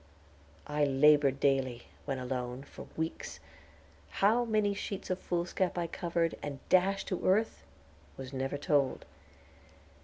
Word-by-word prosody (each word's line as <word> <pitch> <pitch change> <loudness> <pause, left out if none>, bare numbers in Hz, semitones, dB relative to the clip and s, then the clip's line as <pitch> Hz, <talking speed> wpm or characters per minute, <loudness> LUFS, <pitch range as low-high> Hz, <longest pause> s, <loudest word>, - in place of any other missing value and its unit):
I 150 0 0
labored 140 0 +5
daily, 130 -4 +1 0.2
when 135 -2 -2
alone, 125 0 -4
for - - -11
weeks; 160 0 -4 0.7
how 220 +5 +3
many 215 -3 +2
sheets 195 -1 -5
of 185 - -1
foolscap 175 +1 -1
I 175 - 0
covered, 170 -1 -1
and 145 -2 -5
dashed 195 +1 +3
to 185 - -2
earth, 210 +4 +2 0.6
was 135 0 -8
never 135 +2 -2
told. 145 -3 +1
150 Hz, 125 wpm, -31 LUFS, 135-185 Hz, 0.7 s, labored